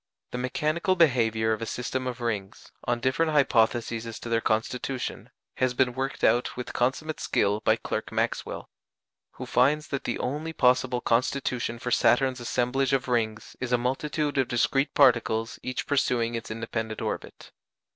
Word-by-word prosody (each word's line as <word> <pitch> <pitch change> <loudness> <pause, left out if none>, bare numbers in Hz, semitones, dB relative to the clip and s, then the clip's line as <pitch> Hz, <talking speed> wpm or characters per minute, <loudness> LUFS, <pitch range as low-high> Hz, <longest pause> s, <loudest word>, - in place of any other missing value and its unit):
The 125 - -3
mechanical 155 +9 0
behaviour 115 -9 +3
of 110 - -4
a 115 - -3
system 130 +1 -3
of 125 -1 -5
rings, 105 -4 -4
on 120 0 0
different 155 +5 +1
hypotheses 115 -4 +2
as 115 - -6
to 120 - -6
their 115 0 +2
constitution, 125 +4 -2 0.3
has 130 -1 +1
been 125 -1 +2
worked 135 +2 -4
out 120 +1 +2
with 125 - -5
consummate 140 +6 -1
skill 100 +1 +1
by - - +3
Clerk - - -4
Maxwell; - - -2 0.7
who - - -7
finds 150 +5 +2
that 140 - -3
the - - -1
only 150 +5 -3
possible 125 -2 +2
constitution 120 0 0
for 125 +1 -4
Saturn's 130 +2 +3
assemblage 125 +3 0
of 135 -1 +1
rings 115 -3 -1
is 130 -1 -3
a 125 - +4
multitude 145 +4 -1
of 130 - +2
discrete 135 +4 +1
particles 115 -4 +3
each 130 - -3
pursuing 120 -4 +1
its 115 -1 -5
independent 110 0 -4
orbit. - - -5
125 Hz, 160 wpm, -27 LUFS, 115-135 Hz, 0.7 s, a